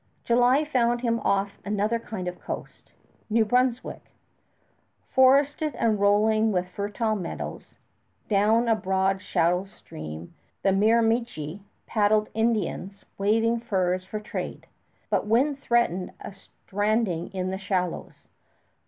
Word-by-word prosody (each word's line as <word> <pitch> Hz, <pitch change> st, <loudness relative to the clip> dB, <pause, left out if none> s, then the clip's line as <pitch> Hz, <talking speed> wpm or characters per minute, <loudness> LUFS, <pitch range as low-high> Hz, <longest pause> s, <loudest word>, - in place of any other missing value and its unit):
July 245 Hz, +5 st, +3 dB
found 240 Hz, -4 st, +1 dB
him 230 Hz, -2 st, 0 dB
off 200 Hz, -1 st, 0 dB
another 210 Hz, +3 st, 0 dB
kind 215 Hz, -5 st, -6 dB
of 180 Hz, 0 st, -5 dB
coast -, -, -8 dB, 0.4 s
New 220 Hz, +1 st, +3 dB
Brunswick 250 Hz, +2 st, 0 dB, 1.1 s
forested 285 Hz, +4 st, +4 dB
and 220 Hz, -3 st, +1 dB
rolling 215 Hz, +2 st, +3 dB
with 180 Hz, -2 st, 0 dB
fertile 205 Hz, +4 st, -2 dB
meadows. 180 Hz, -5 st, -6 dB, 0.5 s
Down 215 Hz, +3 st, +3 dB
a 225 Hz, -, +4 dB
broad 190 Hz, -1 st, 0 dB
shallow 180 Hz, +1 st, +1 dB
stream 80 Hz, -, -10 dB, 0.3 s
the 195 Hz, -, +4 dB
Miramichi 220 Hz, -4 st, +1 dB, 0.2 s
paddled 215 Hz, 0 st, +2 dB
Indians 220 Hz, -3 st, -1 dB
waving 225 Hz, +3 st, +2 dB
furs 185 Hz, -5 st, 0 dB
for 210 Hz, +3 st, -5 dB
trade; 215 Hz, +3 st, -6 dB, 0.5 s
but -, -, +1 dB
wind 270 Hz, +6 st, +2 dB
threatened 215 Hz, -9 st, 0 dB
a -, -, -8 dB
stranding 205 Hz, -3 st, -2 dB
in 185 Hz, -1 st, -3 dB
the 190 Hz, -, -4 dB
shallows. 185 Hz, -3 st, -3 dB
210 Hz, 120 wpm, -26 LUFS, 190-230 Hz, 1.1 s, forested